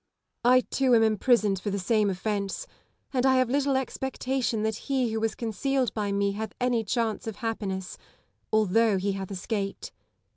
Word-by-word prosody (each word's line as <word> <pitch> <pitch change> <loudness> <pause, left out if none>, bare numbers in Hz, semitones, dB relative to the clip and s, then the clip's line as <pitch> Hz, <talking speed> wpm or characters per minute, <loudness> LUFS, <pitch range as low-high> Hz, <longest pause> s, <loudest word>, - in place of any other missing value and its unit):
I, 250 +1 +6
too, 260 -1 +2
am 225 - +5
imprisoned 215 -2 +3
for 210 - -2
the 200 - -1
same 210 +2 +2
ofience; 200 - -2 0.5
and 250 -2 +1
I 265 0 +5
have 255 -2 +2
little 275 -1 +2
expectation 265 -3 -2
that 220 0 0
he 260 -4 +1
who 220 - -1
was 225 0 -1
con 230 -2 -3
cealed 265 0 0
by 205 -2 -2
me 200 0 +1
hath 220 +2 -5
any 245 -2 +1
chance 225 0 -1
of 220 - -4
happiness, 200 -6 -4 0.5
although 215 0 +3
he 195 +2 0
hath 195 -1 -5
escaped. 195 +1 -4
220 Hz, 175 wpm, -27 LUFS, 200-250 Hz, 0.5 s, I